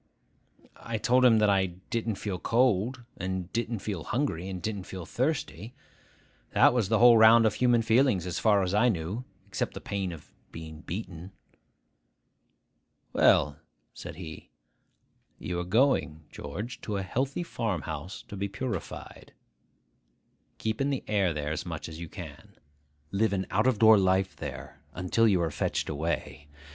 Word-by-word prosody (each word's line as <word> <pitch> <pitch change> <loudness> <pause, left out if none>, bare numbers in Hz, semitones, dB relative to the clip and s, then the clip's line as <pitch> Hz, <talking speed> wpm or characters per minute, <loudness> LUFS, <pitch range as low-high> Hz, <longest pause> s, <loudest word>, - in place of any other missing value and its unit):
I 115 -1 -4
told 125 +3 +3
him 120 -3 +6
that 105 -1 +4
I 95 -1 +2 0.2
didn't 115 -2 -1
feel 95 -2 -4
cold, 120 +2 +1
and 95 -1 -4
didn't 115 -2 -2
feel 95 -7 -3
hungry, 110 - -2
and 95 -1 -5
didn't 100 -1 -4
feel 95 -3 -7
thirsty. 120 - -2 0.8
That - - +6
was 115 -6 +1
the 110 - +3
whole 120 0 +7
round 115 +1 +7
of 110 - +3
human 120 -1 +3
feelings, 115 -5 +3
as 90 0 -3
far 105 -3 +4
as 90 +1 -2
I 110 +4 +4
knew, 100 +5 -3 0.2
except 95 -2 -3
the - - -5
pain 100 -2 -3
of 80 -3 -12 0.2
being 80 -1 -9
beaten. 90 -1 -7 1.8
'Well,' 70 0 +4 0.3
said - - -8
he, 80 -2 -9 0.9
'you 90 -1 -4
are - - -2
going, 90 - +1
George, 110 +8 -6
to 105 -2 -3
a 95 - -2
healthy 135 - -2
farm 110 - -3
house 90 +7 -6
to - - -8
be 100 +1 -2
purified. 115 +5 -6 1.2
Keep 110 +3 -2
in 140 - +1
the 135 -2 -2
air 100 -4 +2
there 75 -1 -3
as 80 - -3
much 85 -3 -6
as 80 0 -9
you 85 -1 -7
can. - - -10 0.6
Live 105 +1 +1
an 95 -1 -1
out 105 +5 +2
of 130 -4 +2
door 110 -1 +7
life 95 0 +1
there, - - -8
until 90 +6 +2
you 95 -4 +3
are 80 - -1
fetched - - -2
away. 75 -1 -3
100 Hz, 160 wpm, -28 LUFS, 90-115 Hz, 1.8 s, whole